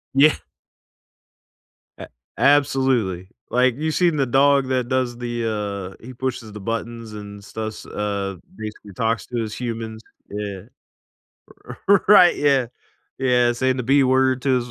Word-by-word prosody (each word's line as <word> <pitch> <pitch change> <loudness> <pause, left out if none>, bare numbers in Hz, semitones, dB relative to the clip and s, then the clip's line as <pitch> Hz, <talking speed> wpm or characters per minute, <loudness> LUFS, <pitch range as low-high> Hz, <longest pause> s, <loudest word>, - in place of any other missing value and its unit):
Yeah. 150 +3 +6 1.6
A - - -9 0.3
absolutely. 130 -10 +2 0.2
Like, 125 0 +2
you've 155 +1 -1
seen 175 -3 +2
the 140 - +1
dog 135 +1 +3
that 125 -2 0
does 130 -2 0
the, 105 -5 -3
uh, - - -21
he 130 - -9
pushes 125 -3 -4
the 105 - -8
buttons 115 +1 -5
and 105 -1 -9
stuffs, 110 +1 -6
uh, 100 -2 -3 0.2
basically 105 -2 -8
talks 115 +3 -1
to 120 - -4
his 110 -1 -4
humans, 115 -2 -5 0.3
yeah. 100 -2 -5 1.3
R 200 -1 +5
right, 180 -4 +7
yeah. 140 -4 +2 0.5
Yeah, 125 -2 +3
saying 130 +2 0
the 125 - -2
b 140 +2 +4
word 130 0 +2
to 135 -2 +2
120 Hz, 140 wpm, -22 LUFS, 105-130 Hz, 1.6 s, right